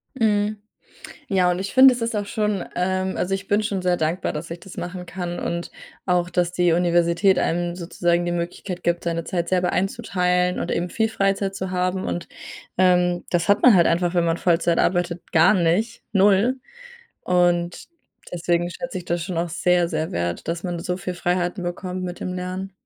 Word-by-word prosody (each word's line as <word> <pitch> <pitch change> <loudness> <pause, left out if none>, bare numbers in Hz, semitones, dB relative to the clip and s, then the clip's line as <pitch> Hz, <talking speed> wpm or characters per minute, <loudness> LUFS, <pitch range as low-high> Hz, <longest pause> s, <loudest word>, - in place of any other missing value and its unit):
Mhm. 210 -3 +1 0.7
Ja, 185 -2 +3
und 180 - -1
ich 195 +1 -5
finde, 260 0 +8
das 245 - -4
ist 230 -1 -1
auch 205 - -1
schon 210 -2 -1
ähm, 185 +1 -1
also, 195 +2 0
ich 195 0 -5
bin 205 +1 +2
schon 195 -3 -2
sehr 180 -1 +2
dankbar, 160 +4 -1
dass 155 +2 -6
ich 170 +1 -6
das 195 - -12
machen 180 +1 -5
kann. 175 -1 -5
Und 170 0 -3 0.4
auch, 180 -1 +1
dass 175 -1 0
die 175 -2 +2
Universität 175 +2 +3
einem 175 +1 -1
sozusagen 175 0 0
die 175 - -1
Möglichkeit 175 +1 -4
gibt, 170 0 0
seine 170 -1 -2
Zeit 170 -2 -2
selber 180 -1 +2
einzuteilen 180 -3 0
und - - -3
eben 175 +1 -1
viel 220 +5 0
Freizeit 195 -1 0
zu 190 -1 -4
haben. 185 +1 -1
Und, 175 - -4 0.5
ähm, 180 -1 +3
das 175 +2 0
hat 200 - +4
man 245 -5 +8
halt 170 -2 +5
einfach, 175 +1 +1
wenn 175 -1 +2
man 165 0 0
Vollzeit 170 -1 +2
arbeitet, 175 -1 0
gar 160 +4 +6
nicht, 190 +6 0
0. 205 +6 +3 0.6
Und 175 -1 +1 0.5
deswegen 175 0 0
schätze 240 -1 -5
ich 180 - -9
das 170 -1 -2
schon 180 -3 -5
auch 170 +1 -1
sehr, 175 +1 +2
sehr 160 -1 -3
wert, 85 0 -3
dass 170 +1 -3
man 175 -2 -3
so 180 +1 -3
viel 180 -1 -5
Freiheiten 175 +1 -1
bekommt 185 +1 -4
mit 180 -1 -6
dem 180 - -4
Lernen. 185 +1 -5
180 Hz, 195 wpm, -23 LUFS, 175-190 Hz, 0.7 s, finde